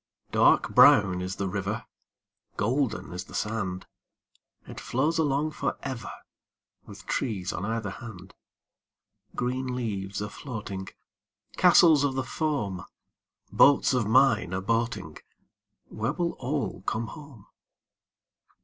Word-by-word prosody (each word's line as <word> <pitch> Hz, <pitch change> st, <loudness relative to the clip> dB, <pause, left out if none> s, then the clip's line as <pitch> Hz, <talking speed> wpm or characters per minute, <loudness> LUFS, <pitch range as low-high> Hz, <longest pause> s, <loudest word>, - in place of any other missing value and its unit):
Dark -, -, +3 dB
brown 90 Hz, -3 st, +6 dB
is 90 Hz, +1 st, -4 dB
the 100 Hz, -, -2 dB
river, 100 Hz, +3 st, -3 dB, 0.7 s
Golden 120 Hz, -2 st, -1 dB
is 90 Hz, +2 st, -5 dB
the -, -, -11 dB
sand. 95 Hz, -4 st, -3 dB, 0.8 s
It -, -, -8 dB
flows 150 Hz, +6 st, 0 dB
along 150 Hz, 0 st, +1 dB
for -, -, -3 dB
ever, 130 Hz, -5 st, -5 dB, 0.8 s
With 100 Hz, -1 st, -12 dB
trees 100 Hz, -7 st, -2 dB
on 95 Hz, -, -4 dB
either 110 Hz, -2 st, -3 dB
hand. 100 Hz, -4 st, -10 dB, 1.0 s
Green 125 Hz, +1 st, -2 dB
leaves 100 Hz, -5 st, -3 dB
a 105 Hz, -, -3 dB
floating, 100 Hz, -8 st, -6 dB, 0.7 s
Castles 170 Hz, -4 st, +6 dB
of 140 Hz, -2 st, 0 dB
the 130 Hz, -, -1 dB
foam, 125 Hz, -, -2 dB, 0.7 s
Boats 140 Hz, -1 st, +5 dB
of 125 Hz, -5 st, +1 dB
mine 115 Hz, -6 st, +3 dB
a 95 Hz, -, -1 dB
boating— 110 Hz, -6 st, -2 dB, 0.7 s
Where 115 Hz, +6 st, -2 dB
will 170 Hz, 0 st, -1 dB
all 125 Hz, -8 st, -3 dB
come 115 Hz, +1 st, -1 dB
home? 145 Hz, -9 st, -12 dB
115 Hz, 120 wpm, -27 LUFS, 100-135 Hz, 1.0 s, brown